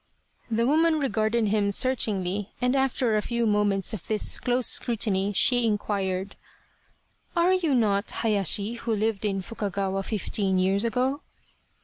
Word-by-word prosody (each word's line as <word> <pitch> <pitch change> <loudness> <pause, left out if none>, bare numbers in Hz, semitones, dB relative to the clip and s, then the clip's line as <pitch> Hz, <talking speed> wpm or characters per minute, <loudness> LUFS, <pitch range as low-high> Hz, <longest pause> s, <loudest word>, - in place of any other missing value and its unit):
The 230 +1 +1
woman 315 +4 +3
regarded 230 -5 0
him 205 -1 +1
searchingly 205 -5 0
and 250 +1 +1
after 260 -4 +1
a 210 - +2
few 235 +1 -1
moments 205 -2 +1
of 205 - -6
this 215 -1 -2
close 250 0 0
scrutiny, 205 -4 0
she 245 +5 +3
inquired: 200 -3 -1 0.5
" - - -40
Are 345 +2 +3
you 335 -7 +1
not 205 -3 +1
Hayashi 205 0 0
who 230 -1 -2
lived 215 0 -1
in 195 -2 -1
Fukagawa 195 -2 -3
fifteen 195 -2 -1
years 190 +3 +1
ago 255 +5 0
215 Hz, 140 wpm, -26 LUFS, 200-245 Hz, 0.5 s, woman